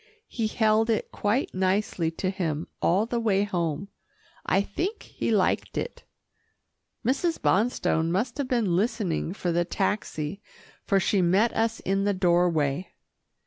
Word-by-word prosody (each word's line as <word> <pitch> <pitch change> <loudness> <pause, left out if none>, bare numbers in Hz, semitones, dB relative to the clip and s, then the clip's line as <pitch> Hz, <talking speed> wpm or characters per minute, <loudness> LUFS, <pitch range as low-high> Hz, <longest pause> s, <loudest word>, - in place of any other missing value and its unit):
He 225 -3 -2
held 220 0 +2
it 220 - 0
quite 215 +6 0
nicely 185 -2 0
to 185 +3 -2
him 165 -5 -2 0.2
all 190 +6 +3
the 235 0 -2
way 205 -3 +2
home. 175 -2 -2 0.5
I 190 - +2
think 370 - -3
he - - -4
liked - - +1
it. 485 - -4 1.0
Mrs. 280 +7 +1
Bonstone 190 -6 +1
must 230 +9 -1
have 280 - 0
been 230 -9 +1
listening 190 -5 0
for 180 -2 -2
the 175 +1 +2
taxi, 185 -2 -2 0.4
for 195 - +2
she 190 +1 +2
met 190 +7 +3
us 225 0 0
in 195 +1 0
the 205 -1 +1
doorway. 175 -3 +2
195 Hz, 145 wpm, -26 LUFS, 175-225 Hz, 1.0 s, all